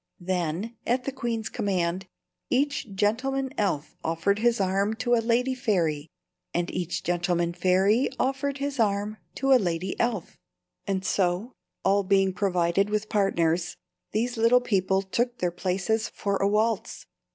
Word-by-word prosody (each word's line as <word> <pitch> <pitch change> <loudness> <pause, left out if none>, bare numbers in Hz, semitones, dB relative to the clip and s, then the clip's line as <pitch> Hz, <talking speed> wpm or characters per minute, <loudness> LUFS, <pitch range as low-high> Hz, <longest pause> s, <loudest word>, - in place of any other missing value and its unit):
Then, 180 +5 -2
at 250 +2 +1
the 275 - -3
queen's 235 -4 -3
command, 190 -4 -1 0.4
each 275 -4 0
gentleman 265 +7 0
elf 175 - -1
offered 165 +5 0
his 235 0 +2
arm 195 +3 +1
to 240 +1 0
a 235 - +4
lady 245 +3 +1
fairy, 170 - 0 0.5
and 175 +1 -1
each 175 -1 -2
gentleman 175 0 0
fairy 190 +7 +3
offered 270 +1 0
his 280 -1 -3
arm 210 0 +1 0.2
to 270 0 +3
a 255 - +6
lady 175 0 -2
elf, 230 -7 -1 0.5
and 190 -1 -1
so, 185 +5 0 0.3
all 200 +1 +4
being 195 -1 +2
provided 180 0 +1
with 210 0 -1
partners, 175 -4 +1 0.3
these 240 +3 -1
little 230 +2 +5
people 195 -5 +1
took 240 +5 -1
their 180 -1 0
places 190 +5 -1
for 200 -1 -2
a 195 - +2
waltz. 215 +1 0
200 Hz, 145 wpm, -26 LUFS, 180-235 Hz, 0.5 s, a